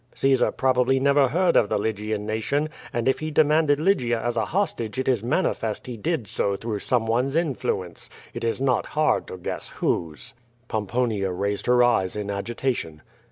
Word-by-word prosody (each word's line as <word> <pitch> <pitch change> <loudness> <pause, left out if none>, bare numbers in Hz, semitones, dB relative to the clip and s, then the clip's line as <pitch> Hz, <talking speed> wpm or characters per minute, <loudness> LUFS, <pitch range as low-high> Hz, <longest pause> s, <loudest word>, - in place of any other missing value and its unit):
Caesar 135 -1 +3
probaBly 130 0 +2
never 140 0 +4
heard 170 +6 +2
of 105 - +4
the - - +1
Lygian 105 0 -2
nation, 125 +8 -1 0.2
and 120 0 -1
if 130 - +2
he 155 - -3
demanded 150 -1 +3
Lygia 140 - +2
as 120 +1 -2
a 110 -2 +1
hostage 135 - -2
it 130 - -1
is 125 -5 +2
manifest 120 - -1
he 125 - -6
did 130 +2 -2
so 100 0 -1
through 110 0 -4
someone's 125 +4 0
iMuence. 125 - -2 0.2
It - - -6
is 115 +1 0
not 130 -2 +1
hard 155 0 +2
to - - -7
guess 90 - -5
whose." 75 -6 -2 0.3
Pomponia 110 -2 -1
raised 100 +4 -2
her 125 0 +5
eyes 95 -7 +2
in 105 -1 -3
agitation. 100 - -3
120 Hz, 170 wpm, -24 LUFS, 105-135 Hz, 0.3 s, her